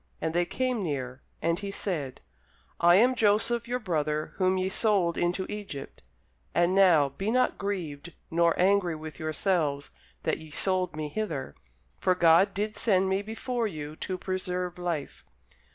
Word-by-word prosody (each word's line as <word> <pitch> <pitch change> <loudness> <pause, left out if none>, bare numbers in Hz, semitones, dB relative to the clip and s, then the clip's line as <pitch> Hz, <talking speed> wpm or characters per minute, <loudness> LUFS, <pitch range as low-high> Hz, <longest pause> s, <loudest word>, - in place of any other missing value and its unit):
And 160 - -2
they 175 +1 +2
came 255 +4 -1
near. 130 -6 -4 0.2
And 170 +2 +1
he 200 -1 -5
said, 165 -9 -3 0.6
I 175 +1 +6
am 245 +6 +5
Joseph 230 +1 +2
your 245 +1 -1
brother 155 -8 -2
whom 185 0 +2
ye 185 0 0
sold 190 -4 +2
into 175 +2 0
Egypt. 195 -10 -7 0.5
And 175 +1 +3
now 175 -7 +5
be 195 +10 -4
not 255 +2 +1
grieved, 175 -6 -4 0.2
nor 170 0 +2
angry 185 -2 +3
with 155 -1 -9
yourselves, 155 -2 0 0.3
that - - 0
ye 160 - -11
sold 185 +2 0
me 155 -1 -4
hither: 160 - -3 0.5
for 185 - +2
God 175 +3 +5
did 210 +2 -2
send 190 -4 +2
me 190 +1 +1
before 225 +2 -2
you 155 -5 -6
to 185 - -4
preserve 180 -1 -3
life. 170 -5 -4
180 Hz, 155 wpm, -28 LUFS, 160-200 Hz, 0.6 s, I